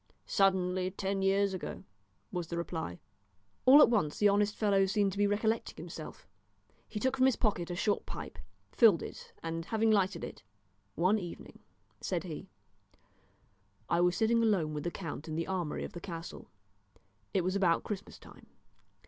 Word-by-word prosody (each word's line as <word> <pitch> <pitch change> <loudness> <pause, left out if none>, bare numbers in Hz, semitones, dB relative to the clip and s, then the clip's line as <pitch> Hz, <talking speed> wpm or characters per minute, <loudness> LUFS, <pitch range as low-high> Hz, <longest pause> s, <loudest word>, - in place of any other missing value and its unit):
"Suddenly, 185 -1 +2
ten 195 0 -2
years 195 +1 +2
ago," 185 - -6 0.5
was 175 -3 -3
the 170 - -4
reply. 165 - -4 0.7
All 285 +3 +10
at - - +5
once 175 -10 +1
the 210 - +5
honest 205 +1 +2
fellow 195 -2 +3
seemed 200 0 +1
to 195 - -7
be 205 - +4
recollecting 220 +2 0
himself. - - -9 0.6
He 210 - -4
took 260 +4 +1
from 260 0 +5
his 260 - +3
pocket 190 -7 0
a 175 - -3
short 205 +3 0
pipe, - - -7 0.3
filled 215 -8 +5
it, - - -9
and 165 0 -3
having 220 +2 +2
lighted 190 -4 +1
it - - -7 0.5
"One 185 +6 +3
evening," 175 -3 -9 0.4
said - - -2
he, - - -7 1.4
"I 170 - +3
was 180 0 +3
sitting 230 +1 +3
alone 190 -9 +2
with 150 +1 -4
the - - +1
count 165 -4 -6
in 155 - -4
the 165 +1 -1
armoury 180 -5 -2
of - - -7
the 175 - -7
castle. 170 -2 -8 0.8
It 190 - +1
was 185 +2 -1
about 180 -4 +2
Christmas 205 -1 -6
time. - - -16
190 Hz, 170 wpm, -32 LUFS, 175-210 Hz, 1.4 s, All